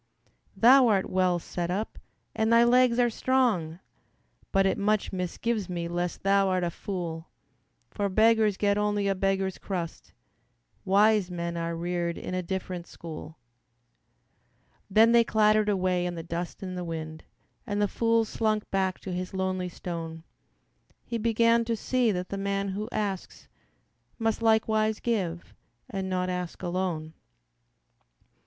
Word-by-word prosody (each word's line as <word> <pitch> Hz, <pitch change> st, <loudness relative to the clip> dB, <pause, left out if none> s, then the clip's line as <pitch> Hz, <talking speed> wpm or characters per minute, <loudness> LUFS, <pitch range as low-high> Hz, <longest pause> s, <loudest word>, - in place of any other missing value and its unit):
"Thou 255 Hz, +2 st, +7 dB
art 200 Hz, -4 st, +1 dB
well 185 Hz, -1 st, +2 dB
set 175 Hz, 0 st, -4 dB
up, 200 Hz, +5 st, -3 dB, 0.4 s
and 220 Hz, +1 st, +1 dB
thy 230 Hz, 0 st, +7 dB
legs 245 Hz, 0 st, +4 dB
are 240 Hz, -1 st, +3 dB
strong, 215 Hz, -11 st, +1 dB, 0.7 s
But 195 Hz, -1 st, +3 dB
it 190 Hz, -, +1 dB
much 210 Hz, +1 st, +1 dB
misgives 190 Hz, +3 st, -2 dB
me 170 Hz, -1 st, -3 dB
lest 175 Hz, 0 st, -3 dB
thou'rt 195 Hz, -2 st, +2 dB
a 170 Hz, -, -1 dB
fool; 170 Hz, -3 st, -5 dB, 0.6 s
For 200 Hz, -2 st, -1 dB
beggars 220 Hz, 0 st, +3 dB
get 205 Hz, 0 st, +2 dB
only 205 Hz, -1 st, 0 dB
a 195 Hz, -, +2 dB
beggar's 195 Hz, 0 st, -1 dB
crust, 175 Hz, -4 st, -5 dB, 0.7 s
Wise 205 Hz, 0 st, +4 dB
men 170 Hz, -1 st, -4 dB
are 170 Hz, 0 st, -2 dB
reared 170 Hz, 0 st, -2 dB
in -, -, -6 dB
a 185 Hz, -, 0 dB
different 180 Hz, -1 st, -5 dB
school." 160 Hz, -1 st, -9 dB, 1.5 s
Then 220 Hz, +3 st, +5 dB
they 235 Hz, 0 st, +6 dB
clattered 215 Hz, -1 st, +3 dB
away 185 Hz, -2 st, +1 dB
in 175 Hz, -, -4 dB
the 165 Hz, -, -6 dB
dust 170 Hz, +3 st, -5 dB
and 185 Hz, -1 st, -5 dB
the 180 Hz, -, -4 dB
wind, 160 Hz, -2 st, -6 dB, 0.4 s
And 205 Hz, -1 st, -1 dB
the 205 Hz, -, +3 dB
fool 230 Hz, +2 st, +2 dB
slunk 215 Hz, -1 st, -1 dB
back 190 Hz, -1 st, 0 dB
to 185 Hz, -, -5 dB
his 180 Hz, +1 st, -4 dB
lonely 185 Hz, -1 st, -1 dB
stone; 165 Hz, -2 st, -6 dB, 0.8 s
He 235 Hz, -1 st, -3 dB
began 230 Hz, +1 st, +3 dB
to 230 Hz, 0 st, 0 dB
see 245 Hz, +1 st, +1 dB
that 180 Hz, -1 st, -3 dB
the 200 Hz, -, -4 dB
man 200 Hz, 0 st, -1 dB
who 210 Hz, +4 st, -4 dB
asks 200 Hz, -3 st, -4 dB, 0.7 s
Must 225 Hz, -1 st, -1 dB
likewise 220 Hz, -1 st, +2 dB
give 185 Hz, -8 st, -2 dB, 0.4 s
and 190 Hz, -1 st, -3 dB
not 180 Hz, 0 st, -1 dB
ask 180 Hz, 0 st, -4 dB
alone. 175 Hz, -3 st, -2 dB
195 Hz, 145 wpm, -27 LUFS, 175-215 Hz, 1.5 s, Thou